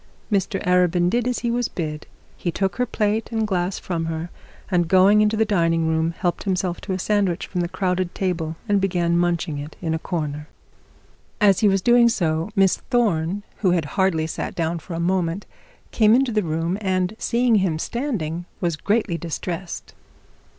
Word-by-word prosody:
Mr 195 0 0
Arabin 180 -1 +3
did 240 +1 +1
as 250 - 0
he 235 - +1
was 240 0 0
bid. 150 -4 -5 0.3
He 175 - -3
took 190 +1 -1
her 250 - +1
plate 215 +1 -1
and 220 -1 0
glass 185 -2 -1
from 165 -3 -3
her, 165 +1 -4 0.4
and 175 -2 +2
going 195 +4 +5
into 215 +1 +2
the 220 - +3
dining 165 -5 +1
room, 160 +1 0
helped 175 -1 -1
himself 185 -2 -1
to 195 - -3
a - - -1
sandwich 195 -2 0
from 180 - -3
the 170 - -2
crowded 185 -1 -1
table 165 -4 -2
and 205 -2 +2
began 175 -3 +1
munching 170 -3 0
it 145 +2 -8
in 165 -2 -2
a 160 - -1
corner. 150 -3 -4 0.9
As 200 -3 +5
he 210 - +4
was 195 -2 +2
doing 240 0 +6
so, 165 -4 0
Miss 195 -2 +4
Thorne, 200 -5 +1
who 190 - +2
had 170 -4 +1
hardly 185 -5 +2
sat 160 - -4
down 165 0 -1
for 165 +2 -7
a - - -3
moment, 180 +1 0 0.5
came 220 0 +5
into 260 -1 +2
the 215 -1 +1
room, 165 +2 -2
and 185 0 0
seeing 235 -1 +2
him 185 -5 +1
standing, 175 - -3
was 170 -3 -1
greatly 200 -3 0
distressed. 170 +1 -5
180 Hz, 185 wpm, -22 LUFS, 165-205 Hz, 0.9 s, doing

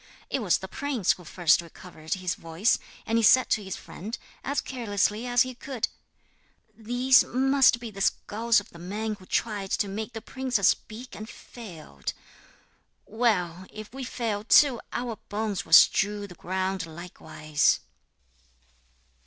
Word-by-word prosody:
It - - 0
was 190 -6 +3
the 190 - -8
prince 260 -1 0
who 180 - -4
first 170 0 +3
recovered 165 -1 -7
his 185 -2 -2
voice, 165 +7 0 0.3
and 225 +1 +1
he - - 0
said 255 +4 +5
to 215 - +2
his 190 -1 -5
friend, 215 +6 -7 0.3
as 280 0 -1
carelessly 220 -2 -1
as 245 +1 +4
he 255 0 -6
could: 250 -1 -3 0.9
'These 245 +4 +4
must 265 -1 +4
be 235 -2 -7
the 195 -1 -8
skulls 225 +3 +2
of 205 - -13
the 170 - -13
men 210 +5 -3
who 185 - -16
tried 205 -4 -1
to 205 - +1
make 215 +4 -5
the 225 - -5
princess 250 -6 +1
speak 235 +4 -4
and 215 +1 -8
failed. 160 - -8 0.9
Well, 185 -6 0
if 215 +1 -10
we 270 0 -6
fail 225 -4 -3
too, 250 +2 +5
our 240 -2 -3
bones 210 -1 -2
will - - -4
strew 205 +1 +6
the 190 - -11
ground 185 0 -3
likewise.' 155 -2 -1
215 Hz, 155 wpm, -27 LUFS, 185-240 Hz, 0.9 s, strew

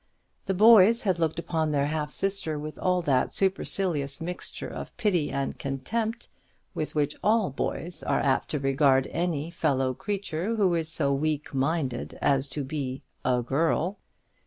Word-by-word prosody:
The 190 - 0
boys 220 +2 +7
had 185 -5 +1
looked 160 -1 0
upon 160 -2 -1
their 140 -2 +1
half 150 0 -2
sister 190 -5 -2
with 150 +1 -7
all 180 -1 +1
that 135 -5 +2
supercilious 185 -7 -1
mixture 175 +2 -5
of - - -8
pity 195 -10 +1
and 135 0 -3
contempt 215 - -3 0.5
with 155 - -4
which 150 -1 +1
all 215 -6 +3
boys 165 +4 -3
are - - +1
apt 135 -1 +1
to 150 - -1
regard 135 -1 +3
any 165 -2 -1
fellow 135 -6 +1
creature 200 - -3
who 195 -5 +3
is 165 -1 -1
so 140 -4 +1
weak 150 +1 -1
minded 135 -2 -1
as 140 -1 +2
to 145 +1 -4
be 135 -2 -4 0.2
a 125 -1 +1
girl. 165 - 0
155 Hz, 160 wpm, -27 LUFS, 140-185 Hz, 0.5 s, boys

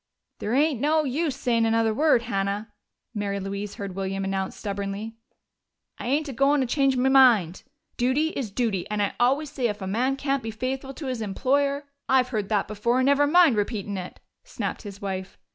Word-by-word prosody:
"There 220 +4 -1
ain't 285 -3 +2
no 310 +1 +3
use 290 +1 -1
sayin' 230 -2 +1
another 225 0 +2
word, 285 -2 +3
Hannah," 205 0 -2 0.4
Mary 200 -2 -2
Louise 200 +1 -5
heard 200 -2 -6
William 195 +1 -3
announce 195 0 -2
stubbornly. 200 +2 -4 0.8
"I - - -5
ain't 295 +4 +1
a 275 - -5
goin' 275 +2 +3
a - - -1
change 270 +1 +2
me 250 +1 +2
mind. 240 -10 +5 0.4
Duty 260 +6 +2
is 265 -8 -4
duty, 200 -4 -1
and 210 0 -2
I 200 -1 0
always 275 +5 +2
say 250 -3 0
if 210 -1 -4
a 190 - -5
man 245 +8 0
can't 275 -1 -1
be 225 - -5
faithful 260 +4 -4
to 305 - -7
his 255 -3 -3
employer 280 +7 0
" - - -54
"I've 255 -1 +4
heard 215 -5 -2
that 210 -3 +1
before, 235 +5 0
never 280 +2 +4
mind 335 -4 +5
repeatin' 205 -1 -2
it!" 180 -1 -7 0.2
snapped - - -4
his 200 -1 -10
wife. 190 -1 -4
235 Hz, 195 wpm, -25 LUFS, 200-275 Hz, 0.8 s, mind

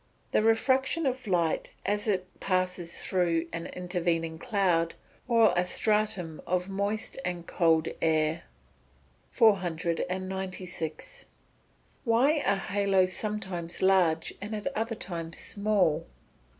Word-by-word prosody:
_ - - -37
The - - +3
refraction 260 +8 +2
of 255 -2 -2
light 170 -4 0
as 205 +2 0
it 185 -3 +1
passes 180 -2 -1
through 170 -3 +1
an 165 0 -4
intervening 170 -3 -2
cloud, 180 -8 +1 0.3
or 230 -2 +5
a 175 - +3
stratum 195 -4 0
of 180 0 0
moist 200 +5 -2
and 175 -1 -3
cold 165 -2 +2
air. 160 0 +1 0.8
496. 185 - -1 0.8
_Why 275 +7 +3
are 200 - +3 0.2
haloes 195 -2 +3
sometimes 190 -6 -4
large 180 -4 +3
and 210 +2 -4
at 210 - -5
other 225 +1 -1
times 170 -6 -5
small? 200 - +1
185 Hz, 110 wpm, -29 LUFS, 170-210 Hz, 0.8 s, or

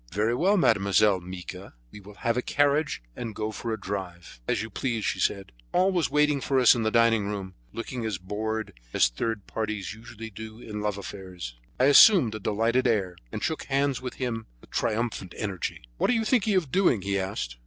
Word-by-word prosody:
"Very 105 +5 +1
well, 190 +11 +3
Mademoiselle 100 - +4
Mica, 90 -5 -9 0.2
we - - -10
will 100 +1 -13
have 115 +2 0
a 125 - +1
carriage 145 - +1
and 115 -3 -5
go 110 0 -2
for 115 +2 -4
a 110 - -2
drive." 90 -8 -6
"As - - 0
you 110 - -7
please," 115 -1 -2
she - - -1
said. 100 -9 0 0.2
Paul 185 +2 +3
was 175 -4 +1
waiting 150 -1 +2
for 135 0 +1
us 125 - +7
in 120 - -1
the 110 - +2
dining 115 -2 +3
room, 100 -2 -4 0.2
looking 115 +1 -5
as 110 -4 -2
bored 110 +4 -3 0.2
as - - +4
third 105 - -3
parties 110 -3 -3
usually 110 0 -10
do 110 +2 -9
in 105 -3 -6
love 105 -1 -1
affairs. 95 -9 -7 0.2
I - - +3
assumed 145 - +7
a 110 - -5
delighted 115 +5 +1
air, 100 -6 +1 0.2
and - - -5
shook 160 - -2
hands 140 -1 0
with 125 -1 -5
him 115 -4 -3
with - - -20
triumphant 110 -5 -2
energy. 100 -4 -4 0.2
"What - - +2
are - - +4
you 225 -2 +1
thinking 215 -3 +2
of 165 -8 +1
doing?" 155 - +3
he 100 0 0
asked. 95 -11 -4
110 Hz, 205 wpm, -27 LUFS, 100-125 Hz, 0.2 s, us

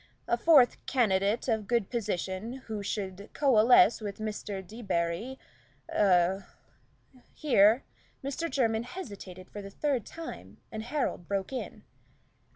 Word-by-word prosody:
A - - +3
fourth 265 0 +5
candidate 210 -3 +1
of 220 -4 0
good 235 -4 0
position, 205 -1 -3
who 215 -2 -4
should 200 0 -4
coalesce 240 -4 +5
with 205 -2 -5
Mr. 210 -3 -5
Debarry 210 +2 -2 0.5
a 190 -1 +3 0.4
" 255 -2 -28
Here 230 -3 +5 0.4
Mr. 280 +5 -3
Jermyn 225 -5 +1
hesitated 200 - -9
for 205 - -7
the 195 - -8
third 265 +3 -1
time, 330 0 -9
and 220 - -4
Harold 245 - -2
broke 200 +4 -2
in. 260 - -6
220 Hz, 125 wpm, -29 LUFS, 195-250 Hz, 0.5 s, fourth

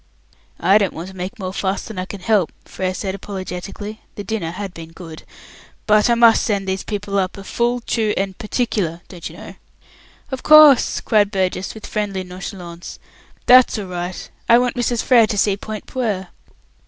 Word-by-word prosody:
"I 195 +5 +5
don't 200 -4 0
want 170 +3 -7
to 190 - -13
make 185 +6 -6
more 185 -3 -5
fuss 195 0 -2
than 215 -4 -7
I 185 - -2
can 200 -1 -8
help," 205 -4 +2
Frere 185 -1 -3
said 190 -1 -3
apologetically 195 +2 -7
the 205 - -6
dinner 205 -6 -3
had 185 +2 -6
been 165 0 -10
good 165 -3 -10 0.6
"but 215 +1 +4
I 235 - +4
must 230 -1 +6
send 200 -2 -1
these 190 0 -1
people 205 -1 -2
up 185 0 -2
a 195 - -8
'full, 240 +4 -1
true 220 -2 0
and 195 -1 -1
particular', 210 -7 -2
don't 175 -3 -7
you - - -13
know." - - -10 0.8
"Of 265 - -4
course," 305 -4 +7
cried 210 -2 +3
Burgess, 190 -1 -2
with 220 - -9
friendly 200 -3 -2
nonchalance. 180 -1 -8 0.5
"That's 255 -1 +6
all 205 - -4
right. 180 0 -5 0.2
I 235 - +8
want 245 0 +1
Mrs. 245 -1 0
Frere 235 -4 +5
to 210 - -3
see 200 0 +3
Point 215 +1 -7
Puer." 210 -8 -3
200 Hz, 185 wpm, -20 LUFS, 185-220 Hz, 0.8 s, I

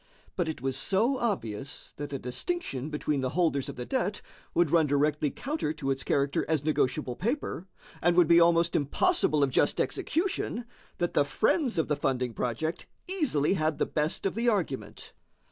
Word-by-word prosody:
But 175 -3 0
it 150 -6 -6
was 135 -1 0
so 210 - +1
obvious 140 - -3
that 145 0 -5
a 140 - -2
distinction 135 - -3
between 150 -2 -1
the 130 - 0
holders 160 -6 +1
of - - -6
the 125 - -5
debt 230 -6 -1 0.4
would 170 -4 +3
run 165 -3 +4
directly 145 +1 +1
counter 275 - -3
to 140 -3 -2
its 135 0 -2
character 140 0 +1
as 155 -3 +1
negotiable 135 -3 0
paper, 225 - -2 0.3
and 175 0 +3
would 175 -3 +6
be 170 +1 +7
almost 170 0 +4
impossible 155 - +2
of 135 - +1
just - - +2
execution, 325 - -1 0.3
that 175 - -1
the 145 - +4
friends 230 - +1
of 160 - +1
the 150 - +1
funding 130 -4 -1
project 155 - -3 0.2
easily 295 - +1
had 155 -4 0
the - - +1
best 150 +5 -1
of 195 - +1
the 235 +2 +1
argument. 180 - -3
155 Hz, 180 wpm, -28 LUFS, 140-195 Hz, 0.4 s, be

